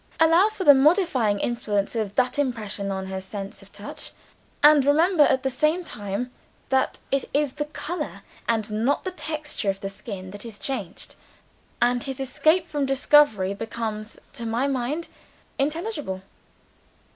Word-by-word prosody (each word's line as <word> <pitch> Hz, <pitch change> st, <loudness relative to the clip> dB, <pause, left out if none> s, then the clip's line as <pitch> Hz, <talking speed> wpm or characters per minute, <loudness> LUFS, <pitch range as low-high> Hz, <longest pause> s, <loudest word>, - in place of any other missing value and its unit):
Allow 330 Hz, +6 st, +6 dB
for 430 Hz, -3 st, -5 dB
the 290 Hz, -, +9 dB
modifying 270 Hz, -, +3 dB
influence 215 Hz, -3 st, -1 dB
of 210 Hz, -3 st, -2 dB
that 255 Hz, +2 st, +1 dB
impression 215 Hz, -7 st, -2 dB
on 190 Hz, -1 st, -3 dB
her 190 Hz, 0 st, -4 dB
sense 195 Hz, +1 st, -7 dB
of 195 Hz, -, -17 dB
touch 205 Hz, +1 st, -6 dB, 0.5 s
and 295 Hz, -1 st, +8 dB
remember 315 Hz, +5 st, +4 dB
at 260 Hz, -, +2 dB
the 265 Hz, -, +1 dB
same 310 Hz, +7 st, +1 dB
time, 205 Hz, -, -4 dB, 0.4 s
that 265 Hz, -1 st, +1 dB
it 275 Hz, -1 st, +1 dB
is 290 Hz, -2 st, +1 dB
the 295 Hz, -, -3 dB
color 300 Hz, +2 st, -5 dB, 0.3 s
and 220 Hz, -2 st, 0 dB
not 230 Hz, +7 st, +1 dB
the 375 Hz, -, -3 dB
texture 305 Hz, -, -3 dB
of 195 Hz, 0 st, -1 dB
the 195 Hz, -, -4 dB
skin 195 Hz, -2 st, -8 dB
that 205 Hz, +1 st, -8 dB
is 225 Hz, -3 st, -8 dB
changed 205 Hz, -10 st, -4 dB, 0.7 s
and 245 Hz, 0 st, +2 dB
his 270 Hz, -1 st, -5 dB
escape 310 Hz, +6 st, +2 dB
from 290 Hz, -4 st, -1 dB
discovery 270 Hz, -8 st, +4 dB
becomes, 220 Hz, 0 st, -5 dB, 0.2 s
to 230 Hz, -, -5 dB
my 235 Hz, +4 st, 0 dB
mind, 280 Hz, +4 st, -1 dB, 0.5 s
intelligible." 295 Hz, -, -2 dB
255 Hz, 155 wpm, -25 LUFS, 210-295 Hz, 0.7 s, the